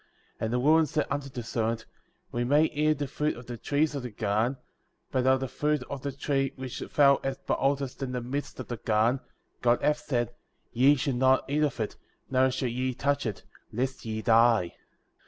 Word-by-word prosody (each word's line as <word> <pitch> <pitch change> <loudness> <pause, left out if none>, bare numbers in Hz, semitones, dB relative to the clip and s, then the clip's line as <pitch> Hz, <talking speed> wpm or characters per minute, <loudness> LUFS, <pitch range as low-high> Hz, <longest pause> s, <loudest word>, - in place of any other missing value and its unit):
8. - - -1
And 110 - -2
the 125 - +2
woman 155 +4 +4
said 150 +2 0
unto 140 0 -2
the 125 -2 -6
serpent: 115 0 -2 0.5
We 120 - -1
may 145 +5 +4
eat 155 -1 0
of - - -9
the 145 0 -2
fruit 150 +2 -1
of 120 - -10
the 120 - -6
trees 145 +6 0
of 140 - -3
the 125 - -5
garden; 110 +3 0
9. 135 - -18 0.6
But - - 0
of 130 0 +5
the 135 - -1
fruit 150 +1 0
of 140 -2 -4
the 140 - -3
tree 135 0 -1
which 130 -1 -6
thou 140 -2 +4 0.3
behold 140 +1 +1
est 135 +1 -7
in 135 -2 -2
the 125 - -2
midst 130 +4 -5
of 130 - -6
the 120 - -3
garden, 110 +4 +2 0.4
God 120 0 +3
hath 150 0 +2
said 120 -5 -1 0.2
— - - -45
Ye 135 +5 +5
shall 135 0 -1
not 130 +1 +3
eat 145 +2 0
of 145 -5 0
it, 110 - -3 0.3
neither 130 0 +4
shall 130 0 -1
ye 130 +1 -2
touch 140 -1 0
it, 105 - -5 0.3
lest 130 +4 -2
ye 110 -1 -4
die. 115 -5 +4
130 Hz, 220 wpm, -28 LUFS, 120-140 Hz, 0.6 s, of